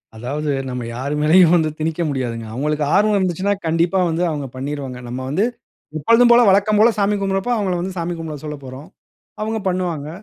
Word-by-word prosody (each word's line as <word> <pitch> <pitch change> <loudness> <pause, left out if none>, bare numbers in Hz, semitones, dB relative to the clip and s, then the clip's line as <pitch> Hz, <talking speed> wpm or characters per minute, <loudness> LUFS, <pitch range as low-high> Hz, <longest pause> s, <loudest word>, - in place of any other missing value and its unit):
அதாவது 145 +6 -3 0.2
நம்ம 125 -1 -4
யார் 140 +4 -3
மேலயும் 170 +2 +5
வந்து 160 -2 +2
திணிக்க 160 +2 -2
முடியாதுங்க 120 -4 -3
அவுங்களுக்கு 150 +3 -1
ஆர்வம் 210 0 +3
இருந்துச்சுன்னா, 190 +2 0
கண்டிப்பா 170 +3 +1
வந்து 165 +2 -1
அவுங்க 145 -3 -4
பண்ணிருவாங்க. 135 -1 -5
நம்ம 125 +2 -5
வந்து, 195 +10 +1 0.5
எப்போதும் 235 +9 +5
போல, 235 - +7
வழக்கம் 205 +2 +3
போல 225 - +6
சாமி 205 +1 +2
கும்பிடுறப்ப, 195 +4 -1
அவுங்கள 190 -3 -1
வந்து 185 +1 -5
சாமி 170 +1 -2
கும்பிட 160 -2 -6
சொல்லப்போறோம். 140 -1 -8 0.5
அவுங்க 220 +1 -2
பண்ணுவாங்க. 175 -5 -3
165 Hz, 170 wpm, -20 LUFS, 145-195 Hz, 0.5 s, போல